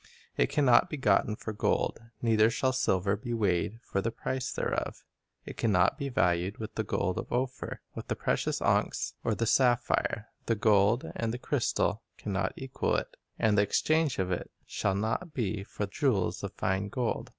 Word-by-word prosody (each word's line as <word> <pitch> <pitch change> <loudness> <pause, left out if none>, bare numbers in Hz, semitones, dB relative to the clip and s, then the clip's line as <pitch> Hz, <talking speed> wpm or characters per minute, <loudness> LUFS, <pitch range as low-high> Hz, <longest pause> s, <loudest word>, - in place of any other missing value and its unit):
"It - - +2
can 145 -2 +2
not 120 -2 +6
be 150 - -4
gotten 105 -3 +2
for 110 - -6
gold, 105 - 0 0.2
Neither 110 -1 +5
shall 130 +3 +1
silver 100 -5 +1
be 115 +3 -4
weighed 100 0 0
for 100 - -1
the 115 - 0
price 130 +3 -3
thereof. - - -2 0.4
It - - -8
can 115 - +1
not 95 - +3
be 140 -1 -2
valued 90 -4 +1
with 110 -1 -6
the - - -1
gold 90 -2 -1
of - - -7
Ophir, 125 +1 -2
With - - -7
the - - -1
precious - - -1
onyx, - - +1
or 110 - +1
the 115 - 0
sapphire. 120 -3 +2 0.2
The 115 - +2
gold 105 +1 +3
and 115 -1 -1
the 120 - -3
crystal 120 -5 0 0.2
can 105 - -4
not 95 - 0
equal 130 -1 -1
it; - - -3 0.2
And 110 -1 +3
the 100 - +5
exchange 155 +7 +2
of 95 -1 -1
it 90 - -2 0.2
shall 95 - -1
not 115 - -2
be 105 -5 -1
for 105 - -4
jewels 100 - 0
of - - -4
fine 95 +2 -1
gold. 120 +2 -2
110 Hz, 190 wpm, -30 LUFS, 100-125 Hz, 0.4 s, not